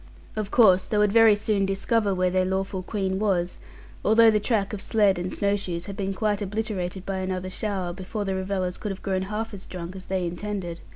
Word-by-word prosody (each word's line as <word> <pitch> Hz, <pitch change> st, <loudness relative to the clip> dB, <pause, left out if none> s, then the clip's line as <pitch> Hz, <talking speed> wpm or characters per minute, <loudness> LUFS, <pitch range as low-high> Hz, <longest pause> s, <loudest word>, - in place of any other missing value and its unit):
Of 215 Hz, -2 st, -2 dB
course 190 Hz, -6 st, +5 dB
they 210 Hz, -, -1 dB
would 210 Hz, -1 st, +4 dB
very 225 Hz, -1 st, +7 dB
soon 205 Hz, -1 st, 0 dB
discover 200 Hz, +2 st, +1 dB
where 185 Hz, 0 st, +1 dB
their 185 Hz, 0 st, +2 dB
lawful 190 Hz, 0 st, -1 dB
queen 190 Hz, 0 st, -2 dB
was, 185 Hz, -4 st, 0 dB, 0.4 s
although 225 Hz, +1 st, +6 dB
the 210 Hz, -, +2 dB
track 210 Hz, -2 st, 0 dB
of 205 Hz, -, -4 dB
sledd 205 Hz, -4 st, +2 dB
and 180 Hz, +1 st, -3 dB
snow 200 Hz, 0 st, +1 dB
shoes 180 Hz, -4 st, -4 dB
had 200 Hz, -, -6 dB
been 195 Hz, -1 st, -2 dB
quite 210 Hz, 0 st, 0 dB
obliterated 200 Hz, -3 st, -3 dB
by 195 Hz, -1 st, -2 dB
another 185 Hz, 0 st, -3 dB
shower, 190 Hz, -4 st, -2 dB
before 195 Hz, +3 st, -4 dB
the 195 Hz, -, -1 dB
revellers 190 Hz, -1 st, -2 dB
could 210 Hz, -, -4 dB
have 190 Hz, -, -8 dB
grown 190 Hz, -2 st, 0 dB
half 220 Hz, +1 st, -3 dB
as 195 Hz, -1 st, -8 dB
drunk 180 Hz, 0 st, -7 dB
as 190 Hz, 0 st, -9 dB
they 190 Hz, -2 st, -1 dB
intended. 175 Hz, -1 st, -4 dB
195 Hz, 215 wpm, -25 LUFS, 185-210 Hz, 0.4 s, very